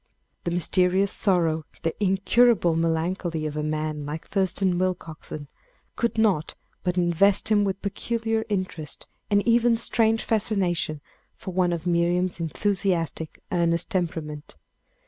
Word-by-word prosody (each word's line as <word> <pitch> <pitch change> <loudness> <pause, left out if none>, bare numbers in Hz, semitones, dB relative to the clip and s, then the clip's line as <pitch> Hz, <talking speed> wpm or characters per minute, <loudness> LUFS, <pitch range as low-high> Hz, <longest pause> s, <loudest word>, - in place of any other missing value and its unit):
The - - +1
mysterious 180 +3 +2
sorrow, 165 -5 +1 0.2
the 165 - 0
incurable 195 -1 +3
melancholy 165 0 -1
of 150 -1 -3
a 150 - -1
man 155 0 -2
like 150 +2 -5
Thurston 190 -2 +1
Willcoxen, 165 -5 -4 0.5
could 235 -1 -1
not 200 -8 +1 0.3
but 180 0 -1
invest 180 +4 +3
him 210 -1 +4
with 195 -1 -2
peculiar 225 +2 -1
interest 185 -7 -3 0.2
and 205 +1 +2
even 235 0 +4
strange 225 -1 +2
fascination 185 -8 0 0.3
for 185 - -7
one 180 -1 +2
of 170 -1 -3
Miriam's 175 +1 +1
enthusiastic, 170 -2 -1
earnest 170 +2 +1
temperament. 160 -5 -3
180 Hz, 125 wpm, -25 LUFS, 165-200 Hz, 0.5 s, him